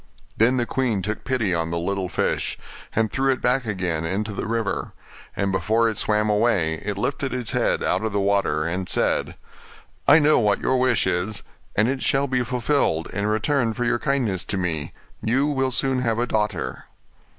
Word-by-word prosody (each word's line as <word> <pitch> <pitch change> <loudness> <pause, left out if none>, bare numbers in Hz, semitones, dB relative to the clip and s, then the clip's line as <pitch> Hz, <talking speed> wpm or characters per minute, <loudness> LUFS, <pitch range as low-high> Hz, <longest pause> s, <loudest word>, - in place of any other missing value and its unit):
Then 125 +4 +3
the 120 - +1
queen 120 -7 -1
took 105 +3 -3
pity 120 -8 0
on 80 -1 -1
the 85 - -2
little 95 +2 -2
fish, - - -1 0.4
and 110 -1 +1
threw 135 0 +2
it 130 - -1
back 125 0 +1
again 90 -6 -1
into 105 +6 -2
the 100 - -4
river; 115 -2 -2 0.4
and 100 -1 0
before 110 +6 +2
it 110 - -1
swam 105 0 +1
away 105 -7 +1
it 105 -1 -3
lifted 140 +4 -2
its 125 -3 -2
head - - +1
out - - 0
of 110 - -1
the 100 - 0
water 100 -6 +1
and 90 +2 -3
said, - - +1 0.7
'I - - +9
know 155 -1 +4
what 105 -3 +2
your 130 -1 +1
wish 125 -5 +2
is, 95 +2 -1 0.3
and 105 +2 +3
it 130 +1 -1
shall 140 0 +2
be 130 -2 0
fulfilled, 125 - 0
in 100 +2 -1
return 115 +2 +1
for 125 - -1
your 120 0 +1
kindness 125 - 0
to 100 - -2
me 80 -5 -2 0.3
you 125 +5 +1
will 135 -3 0
soon 130 0 +1
have 115 -3 0
a 120 - +1
daughter. 105 - -2
110 Hz, 195 wpm, -23 LUFS, 95-125 Hz, 0.7 s, I